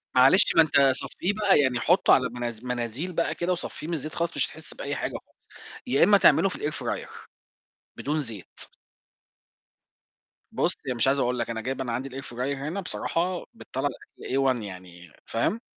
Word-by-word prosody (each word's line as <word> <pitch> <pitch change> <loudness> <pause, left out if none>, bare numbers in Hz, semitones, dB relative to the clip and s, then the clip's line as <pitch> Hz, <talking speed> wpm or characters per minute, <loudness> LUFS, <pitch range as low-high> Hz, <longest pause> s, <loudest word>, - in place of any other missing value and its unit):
معلش 130 +9 +7
ما 165 - +8
أنت 160 -3 +2
صفّيه 175 +8 -1
بقى، 205 -4 +3
يعني 130 -4 +1
حطه 175 +8 +4
على 125 -1 +3
مناز 120 -1 -6
مناديل 125 +7 -3
بقى 170 - -1
كده 175 +1 -2
وصفّيه 175 -3 -2
من 170 - -3
الزيت 155 -1 -3
خالص 170 0 -2
مش - - +3
هتحس - - -4
بأي - - -4
حاجة - - -3
خالص، - - -33 0.4
يا 135 +3 +3
إمّا 205 0 +6
تعمله 165 +1 +5
في - - -6 0.2
الair - - -8
fryer - - -4 0.9
بدون 150 +2 -2
زيت. 115 -9 -3 1.9
بُصّ، - - +2
يعني 130 -2 -2
مش 120 - +2
عايز 140 +1 +2
أقول 125 -1 0
لك 115 - -2
أنا 115 -1 -4
جايب 135 +3 -4
أنا 125 -2 -3
عندي 130 +4 -3
الair 135 +1 -7
fryer 120 - -10 0.2
هنا 155 +8 -4
بصراحة 180 0 0
بتطلَّع - - -4 0.3
الأكل - - -4
A 135 -1 +3
one 120 - -6
يعني 90 -4 -11
فاهم؟ 205 - -1
135 Hz, 185 wpm, -26 LUFS, 120-170 Hz, 1.9 s, ما